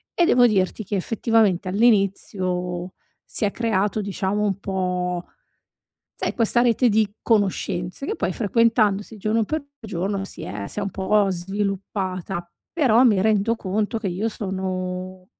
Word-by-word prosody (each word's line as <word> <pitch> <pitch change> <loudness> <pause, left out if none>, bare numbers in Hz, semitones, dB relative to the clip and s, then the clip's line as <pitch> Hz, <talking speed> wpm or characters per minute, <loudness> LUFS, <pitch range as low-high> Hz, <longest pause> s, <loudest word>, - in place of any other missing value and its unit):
e 345 - +4
devo 245 -5 +5
dirti 205 0 0
che 200 - -3
effettivamente 210 -2 +1
all'inizio 185 -4 0 0.3
si 210 - +1
è 200 - 0
creato, 210 -2 0
diciamo, 200 0 -2
un 195 -2 0
po' 180 -2 -2 0.9
sai - - -2
questa 235 +1 +4
rete 245 +1 +3
di 215 -1 +1
conoscenze 200 0 0
che - - -2
poi, 180 - -1
frequentandosi 215 0 +1
giorno 215 +2 +1
per 305 +5 -3 0.2
giorno, 195 -1 -3
si - - -6
è 100 -1 -5
si - - -7
è - - 0
un 200 - -2
po' 195 +2 +2
sviluppata. 185 -1 -3 0.3
Però 255 -7 +4
mi 210 -6 +4
rendo 215 +1 +2
conto 210 +3 -2
che 210 -3 -3
io 190 +6 -1
sono 185 -2 -4
200 Hz, 145 wpm, -23 LUFS, 185-220 Hz, 0.9 s, devo